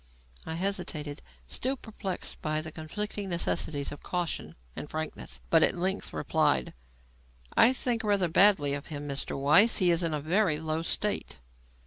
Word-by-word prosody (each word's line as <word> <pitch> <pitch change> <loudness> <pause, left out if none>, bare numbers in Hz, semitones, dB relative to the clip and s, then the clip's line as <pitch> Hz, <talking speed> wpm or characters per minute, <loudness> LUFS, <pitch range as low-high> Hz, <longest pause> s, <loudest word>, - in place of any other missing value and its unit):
I 160 - -3
hesitated, 170 -5 -3 0.3
still 260 - -1
perplexed 210 -5 -6
by 155 0 0
the 160 0 -6
conflicting 200 +6 -4
necessities 160 -4 -1
of 145 - -9
caution 175 -2 -3 0.2
and 150 - -6
frankness, 155 - -5
but - - +6
at - - +3
length 185 +2 -1
replied: 65 -2 +1 0.8
"I 235 - +7
think 245 -3 0
rather 200 -4 +2
badly 185 -4 +4
of 140 0 -5
him, 145 -1 -6
Mr. 140 -1 -3
Weiss. 160 +12 +6
He 180 -3 +4
is 170 +1 +2
in 165 -3 0
a - - -2
very 165 +2 +2
low 160 0 -2
state." 205 - -2
165 Hz, 155 wpm, -29 LUFS, 150-200 Hz, 0.8 s, I